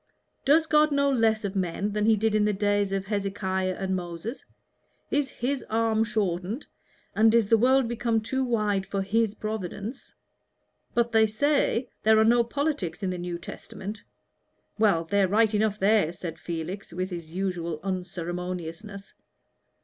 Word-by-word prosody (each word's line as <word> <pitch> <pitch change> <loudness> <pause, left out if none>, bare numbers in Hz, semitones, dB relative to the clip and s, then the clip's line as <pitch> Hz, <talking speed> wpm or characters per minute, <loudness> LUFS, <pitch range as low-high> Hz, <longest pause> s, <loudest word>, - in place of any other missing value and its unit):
Does 310 +4 +5
God 305 -1 +4
know 280 0 +2
less 225 -4 +2
of 200 0 -4
men 190 +2 -1
than 210 +1 0
He 225 - +6
did 220 +1 +1
in 215 -1 +3
the 210 0 +2
days 205 0 +1
of 195 -1 -1
Hezekiah 195 -2 -1
and 190 -1 -2
Moses? 175 +7 -5 0.7
is 285 -2 +1
His 260 +3 -2
arm 225 0 +2
shortened, 210 - -2 0.5
and 220 +1 +5
is 225 -3 +3
the 225 - +6
world 260 +1 +4
become 235 -1 0
too 265 +5 -1
wide 210 -5 +1
for 195 -1 -2
His 220 +1 +1
providence? 215 +2 -5 0.8
But, 235 0 +2
they 220 -1 +5
say, 265 +1 +1
there 220 0 +5
are 220 - +5
no 235 +1 +5
politics 235 - -2
in 185 - 0
the 180 - -4
New 175 0 -4
Testament 205 +4 -8 0.4
" - - -46
"Well, 200 -7 +3
they're 195 +3 +2
right 215 +3 +3
enough 210 0 +1
there," 200 -4 +3
said 170 -2 -7
Felix, 175 +4 -5
with 185 +2 -3
his 170 -3 -6
usual 175 -3 -3
unceremoniousness. 180 +1 -5
210 Hz, 160 wpm, -27 LUFS, 185-225 Hz, 0.8 s, He